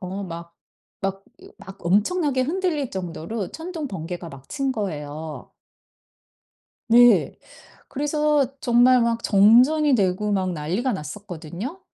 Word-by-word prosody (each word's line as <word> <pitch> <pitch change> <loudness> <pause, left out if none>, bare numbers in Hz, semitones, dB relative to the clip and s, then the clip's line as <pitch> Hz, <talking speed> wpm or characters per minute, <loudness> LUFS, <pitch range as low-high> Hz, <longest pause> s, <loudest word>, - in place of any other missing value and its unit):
어 190 +2 -5
막 170 -1 -9 0.5
막 195 0 -3 0.2
어 - - -15
막 190 +1 -12
엄청나게 260 - +2
흔들릴 315 -3 -1
정도로 185 +3 -5
천둥 325 -2 -5
번개가 175 -2 -6
막 135 -2 -13
친 275 -2 -1
거예요. 155 - -6 1.4
네. 240 +1 +5 0.5
그래서 295 -1 0
정말 245 +1 +5
막 230 0 0
정전이 250 +9 +5
되고 205 -1 +1
막 185 -2 0
난리가 180 - -2
났었거든요. 190 - -7
210 Hz, 230 characters per minute, -23 LUFS, 180-270 Hz, 1.4 s, 네